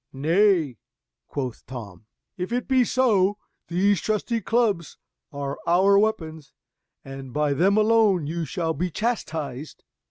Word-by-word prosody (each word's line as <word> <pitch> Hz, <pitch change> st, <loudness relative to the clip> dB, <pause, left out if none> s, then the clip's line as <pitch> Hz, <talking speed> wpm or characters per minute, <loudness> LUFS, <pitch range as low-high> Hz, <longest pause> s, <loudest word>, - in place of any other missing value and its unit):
"Nay," 160 Hz, -, +2 dB, 0.5 s
quoth 130 Hz, -5 st, -5 dB
Tom, 110 Hz, -6 st, -9 dB, 0.3 s
"if 180 Hz, +2 st, -5 dB
it 245 Hz, +1 st, -2 dB
be 260 Hz, -2 st, +4 dB
so, 210 Hz, -6 st, +2 dB, 0.3 s
these 190 Hz, +2 st, +2 dB
trusty 220 Hz, +2 st, -1 dB
clubs 215 Hz, -9 st, 0 dB, 0.3 s
are 140 Hz, -1 st, -5 dB
our 190 Hz, +4 st, +4 dB
weapons, 160 Hz, -8 st, -2 dB, 0.5 s
and 135 Hz, -1 st, -8 dB
by 150 Hz, +1 st, +1 dB
them 190 Hz, +8 st, +3 dB
alone 215 Hz, -6 st, +3 dB
you 165 Hz, +3 st, -3 dB
shall 160 Hz, 0 st, -2 dB
be 180 Hz, +4 st, -2 dB
chastised." 155 Hz, -, -4 dB
175 Hz, 125 wpm, -24 LUFS, 145-210 Hz, 0.5 s, be